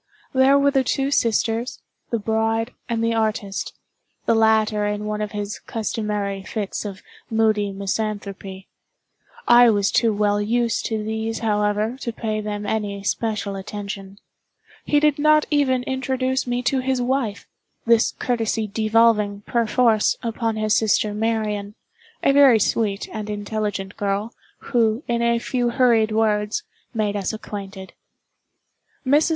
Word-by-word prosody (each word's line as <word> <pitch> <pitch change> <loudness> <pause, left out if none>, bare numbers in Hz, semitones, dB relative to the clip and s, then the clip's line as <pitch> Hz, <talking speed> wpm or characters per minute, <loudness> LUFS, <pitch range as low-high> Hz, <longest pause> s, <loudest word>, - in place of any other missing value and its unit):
There 265 +1 +5
were 280 0 +3
the 270 -1 +2
two 270 +2 0
sisters, 230 -1 0 0.3
the 235 - 0
bride, 225 +2 0 0.2
and 230 -1 -1
the 230 0 +1
artist—the 215 0 -3
latter 220 -1 +3
in 210 0 -3
one 210 0 -2
of 210 -1 -3
his 205 0 -4
customary 210 -3 -3
fits 205 +1 -4
of 195 -2 -7 0.3
moody 215 -2 +2
misanthropy. 195 -1 -4 0.8
I 240 0 +8
was 205 -2 +2
too 230 -2 +3
well 205 0 +1
used 230 +2 0
to 220 -2 -2
these, 220 +1 -3
however, 210 +2 0
to 235 - -3
pay 215 -1 -3
them 210 0 -4
any 205 -1 -2
special 210 -1 -2
attention. 195 0 -7 0.7
He 295 - +3
did 300 -1 +2
not 305 0 +4
even 260 -4 +2
introduce 260 0 -1
me 245 0 -1
to 260 +2 +1
his 260 0 0
wife—this 235 -2 -1
courtesy 225 -2 -1
devolving, 215 -1 +2
per 235 +2 0
force, 225 -2 +3
upon 230 -1 -1
his 215 -1 +1
sister 210 -1 +2
Marian—a 220 - -2
very 275 -4 +7
sweet 205 -1 0
and 215 -1 -5
intelligent 205 -1 -3
girl, 205 +3 -2 0.4
who, 230 0 +2
in 235 0 0
a 235 0 +2
few 245 +1 -1
hurried 235 -3 +3
words, 215 - +1 0.3
made 215 -3 -1
us 200 +1 -2
acquainted. 195 -3 -8 1.1
Mrs. 290 +5 +4
220 Hz, 135 wpm, -22 LUFS, 210-240 Hz, 1.1 s, I